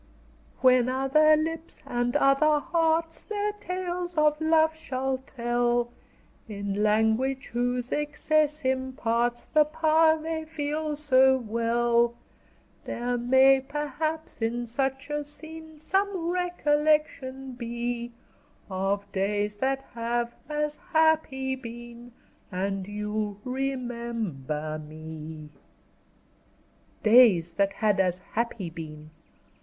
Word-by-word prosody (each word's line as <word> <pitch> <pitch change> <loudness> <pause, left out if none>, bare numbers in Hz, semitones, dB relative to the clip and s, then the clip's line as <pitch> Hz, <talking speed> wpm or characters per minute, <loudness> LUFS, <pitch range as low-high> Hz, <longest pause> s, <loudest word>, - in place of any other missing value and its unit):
"When 255 -1 +5
other 270 +4 +4
lips 325 +1 -4
and 245 +1 -1
other 295 +2 +4
hearts 325 +1 0
Their 420 -1 -2
tales 360 -3 -4
of 300 0 +3
love 315 0 +3
shall 265 -3 -2
tell, 240 -2 0 0.6
In 200 -1 -3
language 220 +5 +1
whose 245 +1 -1
excess 300 0 0
imparts 245 -2 0
The 305 - +4
power 315 +1 +3
they 320 0 -4
feel 305 -1 -3
so 265 -3 +4
well, 235 0 +1 0.7
There 245 +1 -2
may, 265 +3 +5
perhaps, 295 +2 -4
in 240 +2 -1
such 270 +4 -2
a 295 0 -1
scene, 315 +1 -8
Some 375 +1 0
recollection 300 -6 0
be, 240 0 -4 0.6
Of 195 +2 -1
days 205 +2 -1
that 270 +3 0
have 235 0 -2 0.2
as 300 0 -1
happy 310 -5 +1
been 240 -1 -10 0.4
And 195 +1 -2
you'll 210 0 -3
remember 235 - -3
me." 155 0 -9 1.5
Days 215 -8 +6
that 200 +2 +1
had 210 -1 +1
as 180 -2 +2 0.2
happy 225 -6 -2
been! 155 -2 -9
260 Hz, 100 wpm, -27 LUFS, 230-305 Hz, 1.5 s, Days